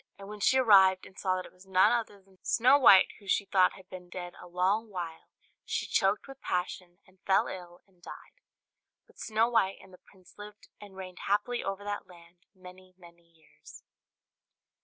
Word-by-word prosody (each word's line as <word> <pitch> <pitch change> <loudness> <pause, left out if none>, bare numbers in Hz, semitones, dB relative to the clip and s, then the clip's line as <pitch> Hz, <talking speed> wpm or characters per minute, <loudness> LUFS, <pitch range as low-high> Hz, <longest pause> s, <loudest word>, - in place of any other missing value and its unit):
And 195 - -11
when 210 0 -9
she 260 +6 +3
arrived, 190 -6 +5
and 190 - -16
saw 185 -1 -1
that 185 - -5
it - - -15
was 185 +1 -20
none 190 0 +4
other 230 -4 -2
than 190 -1 -27
Snow 255 +5 +4
White, 195 -8 +7
who 200 - -18
she 200 - +1
thought 190 -2 +3
had 190 -1 -16
been 180 -1 -11
dead 175 0 -8
a - - -12
long 190 +6 0
while, 170 -4 -7 0.3
she - - -3
choked 195 +6 0
with 270 -1 -13
passion, 180 0 -4
and 185 -1 -26
fell 190 - +3
ill 175 -1 -9
and 185 -3 -32
died; - - -13 0.6
but - - -24
Snow 220 +1 +1
White 225 -5 +1
and 190 -1 -17
the 180 - -16
prince 185 -2 -22
lived 210 +1 -12
and 205 -2 -13
reigned 185 -1 -9
happily 210 +5 0
over 195 +1 -5
that 205 0 -5
land 175 +1 -19
many, 185 0 -15
many 170 -1 -18
years. 160 -1 -18
190 Hz, 195 wpm, -29 LUFS, 180-205 Hz, 0.6 s, White